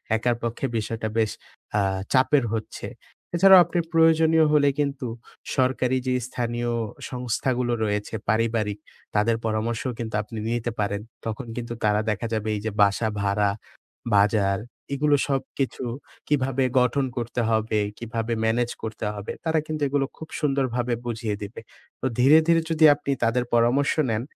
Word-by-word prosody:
একার 120 Hz, +2 st, +1 dB
পক্ষে 115 Hz, +3 st, -2 dB
বিষয়টা 110 Hz, 0 st, -3 dB
বেশ 110 Hz, -2 st, +2 dB, 0.5 s
আ -, -, +3 dB, 0.3 s
চাপের 135 Hz, +1 st, +4 dB
হচ্ছে। 110 Hz, -1 st, -4 dB, 0.5 s
এছাড়াও 190 Hz, +2 st, +8 dB
আপনি 175 Hz, +1 st, -1 dB
প্রয়োজনীয় 160 Hz, 0 st, +5 dB
হলে 145 Hz, -1 st, +5 dB
কিন্তু 140 Hz, -3 st, -1 dB, 0.5 s
সরকারি 130 Hz, -1 st, +1 dB
যে 130 Hz, -, +2 dB
স্থানীয় 120 Hz, -1 st, -2 dB, 0.4 s
সংস্থাগুলো 125 Hz, 0 st, -1 dB
রয়েছে, 105 Hz, 0 st, -2 dB, 0.2 s
পারিবারিক, 110 Hz, -1 st, 0 dB, 0.4 s
তাদের 110 Hz, +2 st, +3 dB
পরামর্শ 110 Hz, +1 st, -1 dB, 0.2 s
কিন্তু 110 Hz, -2 st, -4 dB
আপনি 110 Hz, +2 st, -9 dB
নিতে 120 Hz, 0 st, -1 dB
পারেন। 100 Hz, 0 st, -1 dB, 0.2 s
তখন 115 Hz, +4 st, -4 dB
কিন্তু 120 Hz, -1 st, -4 dB
তারা 105 Hz, 0 st, +3 dB
দেখা 105 Hz, +2 st, -1 dB
যাবে, 110 Hz, -1 st, -2 dB
এই 105 Hz, -, -4 dB
যে 110 Hz, -, -1 dB
বাসা 100 Hz, +3 st, +3 dB
ভাড়া, 100 Hz, 0 st, +2 dB, 0.7 s
বাজার 100 Hz, -1 st, +3 dB, 0.3 s
এগুলো 145 Hz, +1 st, +3 dB
সবকিছু 135 Hz, -1 st, -2 dB, 0.4 s
কিভাবে 135 Hz, -2 st, +1 dB, 0.2 s
গঠন 130 Hz, +2 st, +2 dB
করতে 120 Hz, 0 st, -2 dB
হবে, 110 Hz, -1 st, +1 dB, 0.2 s
কীভাবে 115 Hz, 0 st, -3 dB
ম্যানেজ 120 Hz, +2 st, +1 dB
করতে 110 Hz, -1 st, -4 dB
হবে, 100 Hz, -1 st, -6 dB
তারা 160 Hz, -1 st, +2 dB
কিন্তু 155 Hz, -1 st, -4 dB
এগুলো 140 Hz, 0 st, +1 dB
খুব 160 Hz, -, -8 dB
সুন্দরভাবে 130 Hz, -5 st, 0 dB
বুঝিয়ে 110 Hz, -3 st, -2 dB
দিবে। 105 Hz, +3 st, -7 dB, 0.4 s
তো -, -, -3 dB
ধীরে, 135 Hz, +5 st, +7 dB
ধীরে 165 Hz, -1 st, +4 dB
যদি 160 Hz, -1 st, +4 dB
আপনি 140 Hz, -1 st, -4 dB
তাদের 115 Hz, +2 st, +2 dB
পরামর্শ 120 Hz, +4 st, +3 dB, 0.2 s
নেন 110 Hz, +1 st, 0 dB
120 Hz, 145 wpm, -25 LUFS, 110-135 Hz, 0.7 s, এছাড়াও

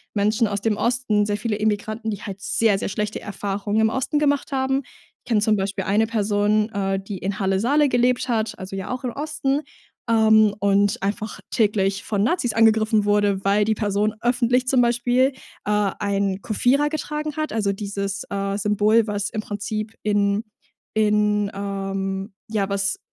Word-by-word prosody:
Menschen 210 Hz, +2 st, +2 dB
aus 200 Hz, -1 st, -3 dB
dem 215 Hz, -1 st, 0 dB
Osten, 235 Hz, -4 st, +1 dB
sehr 205 Hz, 0 st, 0 dB
viele 215 Hz, 0 st, -2 dB
Immigranten, 215 Hz, +1 st, -1 dB
die 205 Hz, -1 st, -5 dB
halt 195 Hz, -1 st, -6 dB
sehr, 215 Hz, -1 st, +2 dB
sehr -, -, -3 dB
schlechte 210 Hz, +1 st, -3 dB
Erfahrungen 205 Hz, +1 st, -2 dB
im 220 Hz, -, +4 dB
Osten 265 Hz, +5 st, -1 dB
gemacht 285 Hz, -2 st, +1 dB
haben. 265 Hz, 0 st, 0 dB, 0.5 s
Kenne 225 Hz, -3 st, +2 dB
zum 215 Hz, 0 st, +3 dB
Beispiel 195 Hz, 0 st, -2 dB
eine 210 Hz, +3 st, +2 dB
Person, 210 Hz, -1 st, +1 dB
äh, 195 Hz, -2 st, -1 dB
die 195 Hz, 0 st, -6 dB
in 190 Hz, +1 st, -3 dB
Halle-Saale 225 Hz, +10 st, +2 dB
gelebt 245 Hz, +1 st, +1 dB
hat, 220 Hz, -2 st, -1 dB
also, 190 Hz, +1 st, -6 dB
ja 195 Hz, +3 st, -5 dB
auch 255 Hz, 0 st, -4 dB
im 250 Hz, -, -2 dB
Osten, 285 Hz, 0 st, -1 dB, 0.5 s
ähm, 220 Hz, -2 st, +5 dB
und 200 Hz, 0 st, +2 dB
einfach 210 Hz, +2 st, -3 dB
täglich 200 Hz, -2 st, +1 dB
von 205 Hz, -2 st, -1 dB
Nazis 245 Hz, -3 st, +1 dB
angegriffen 220 Hz, -1 st, +3 dB
wurde, 205 Hz, -1 st, +2 dB
weil 205 Hz, +1 st, +3 dB
die 220 Hz, +1 st, +1 dB
Person 210 Hz, 0 st, 0 dB
öffentlich 245 Hz, +1 st, +2 dB
zum 255 Hz, -1 st, +4 dB
Beispiel, 245 Hz, +2 st, +2 dB, 0.4 s
äh, 210 Hz, -1 st, +1 dB
ein 200 Hz, -1 st, -1 dB
Kufira 265 Hz, +7 st, +2 dB
getragen 300 Hz, 0 st, -4 dB
hat. 310 Hz, 0 st, -2 dB
Also, 205 Hz, -3 st, 0 dB
dieses, 200 Hz, 0 st, -4 dB
äh, 200 Hz, 0 st, -2 dB
Symbol, 210 Hz, +2 st, +2 dB
was 205 Hz, -1 st, -2 dB
im 215 Hz, -, -3 dB
Prinzip 215 Hz, +1 st, -4 dB
in 205 Hz, 0 st, +1 dB, 0.5 s
in, 210 Hz, -1 st, +2 dB
ähm, 195 Hz, 0 st, -3 dB, 0.2 s
ja, 205 Hz, -3 st, -1 dB
was 195 Hz, 0 st, -1 dB
210 Hz, 165 wpm, -22 LUFS, 200-230 Hz, 0.5 s, ähm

